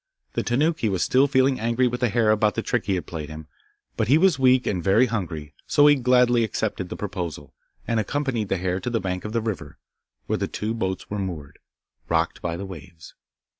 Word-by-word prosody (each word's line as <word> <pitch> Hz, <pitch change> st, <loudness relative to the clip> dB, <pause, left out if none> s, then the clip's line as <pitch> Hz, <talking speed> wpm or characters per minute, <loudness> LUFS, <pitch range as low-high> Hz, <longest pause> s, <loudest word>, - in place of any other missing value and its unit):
The -, -, 0 dB
Tanuki 145 Hz, 0 st, +1 dB
was 95 Hz, -3 st, 0 dB
still 135 Hz, +2 st, +4 dB
feeling 130 Hz, -1 st, +2 dB
angry 115 Hz, +3 st, +1 dB
with 125 Hz, 0 st, -3 dB
the 125 Hz, -2 st, +2 dB
hare 110 Hz, 0 st, +3 dB
about 105 Hz, 0 st, +2 dB
the 115 Hz, -, -2 dB
trick 120 Hz, -, -1 dB
he 100 Hz, -, +2 dB
had 90 Hz, -, -3 dB
played 80 Hz, -3 st, -6 dB
him, 80 Hz, 0 st, -8 dB, 0.5 s
but 110 Hz, -, +1 dB
he 140 Hz, +6 st, +5 dB
was 170 Hz, -4 st, +3 dB
weak 130 Hz, -1 st, +4 dB
and 90 Hz, -4 st, -1 dB
very 100 Hz, +6 st, +4 dB
hungry, 85 Hz, -, -4 dB
so 145 Hz, -, +4 dB
he 145 Hz, -, +8 dB
gladly 125 Hz, -2 st, +3 dB
accepted 100 Hz, -3 st, -2 dB
the -, -, -5 dB
proposal, 85 Hz, -7 st, -5 dB, 0.3 s
and 115 Hz, -1 st, +1 dB
accompanied 120 Hz, -2 st, -1 dB
the 95 Hz, -, +1 dB
hare 90 Hz, +1 st, -1 dB
to 125 Hz, -, -3 dB
the 115 Hz, -1 st, 0 dB
bank 90 Hz, -1 st, -4 dB
of 105 Hz, -, -4 dB
the 115 Hz, 0 st, 0 dB
river, 110 Hz, -4 st, -5 dB, 0.5 s
where -, -, -1 dB
the -, -, -2 dB
two 110 Hz, +2 st, -3 dB
boats 95 Hz, -5 st, -3 dB
were 105 Hz, -, -2 dB
moored, 85 Hz, -7 st, -6 dB, 0.5 s
rocked 80 Hz, 0 st, 0 dB
by 85 Hz, -1 st, -3 dB
the 100 Hz, -, -5 dB
waves. 80 Hz, -4 st, -11 dB
110 Hz, 215 wpm, -24 LUFS, 90-125 Hz, 0.5 s, he